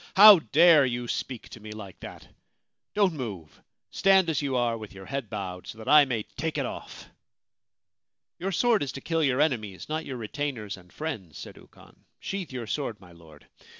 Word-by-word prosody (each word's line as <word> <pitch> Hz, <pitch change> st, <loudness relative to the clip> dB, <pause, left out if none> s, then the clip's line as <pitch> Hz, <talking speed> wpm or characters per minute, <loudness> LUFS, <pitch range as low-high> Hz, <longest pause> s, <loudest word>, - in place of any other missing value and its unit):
' -, -, -45 dB
How 205 Hz, -1 st, +11 dB
dare 155 Hz, +3 st, +6 dB
you 120 Hz, -2 st, -2 dB
speak 125 Hz, 0 st, -4 dB
to -, -, -11 dB
me 105 Hz, 0 st, -10 dB
like 100 Hz, -3 st, -10 dB
that? -, -, -10 dB, 0.7 s
Don't 200 Hz, -4 st, +3 dB
move! 95 Hz, -, -7 dB, 0.3 s
Stand 190 Hz, -3 st, +4 dB
as 150 Hz, -, -1 dB
you 140 Hz, -2 st, -2 dB
are, 120 Hz, -2 st, +1 dB
with 110 Hz, -3 st, -9 dB
your 95 Hz, 0 st, -11 dB
head 135 Hz, -3 st, -4 dB
bowed, 95 Hz, -4 st, -6 dB
so -, -, -8 dB
that 110 Hz, -, -10 dB
I 150 Hz, -1 st, +7 dB
may 120 Hz, -5 st, -2 dB
take 160 Hz, +5 st, -5 dB
it 140 Hz, -, 0 dB
off/ -, -, -8 dB, 0.7 s
* -, -, -63 dB
Your 190 Hz, +3 st, -2 dB
sword 235 Hz, +4 st, +2 dB
is 140 Hz, -, -2 dB
to 135 Hz, -, -7 dB
kill 165 Hz, +1 st, 0 dB
your 135 Hz, -2 st, +1 dB
enemies, 110 Hz, -11 st, -1 dB
not 155 Hz, +1 st, -2 dB
your 130 Hz, -, -5 dB
retainers 115 Hz, -2 st, -4 dB
and 90 Hz, -1 st, -18 dB
friends,' 110 Hz, -, -6 dB
said -, -, -9 dB
Ukon. -, -, -19 dB
' -, -, -51 dB
Sheathe 190 Hz, -6 st, -5 dB
your 125 Hz, -3 st, -5 dB
sword, 115 Hz, -1 st, -3 dB
my 90 Hz, -2 st, -16 dB
Lord. 80 Hz, -3 st, -17 dB
130 Hz, 205 wpm, -27 LUFS, 105-155 Hz, 0.7 s, How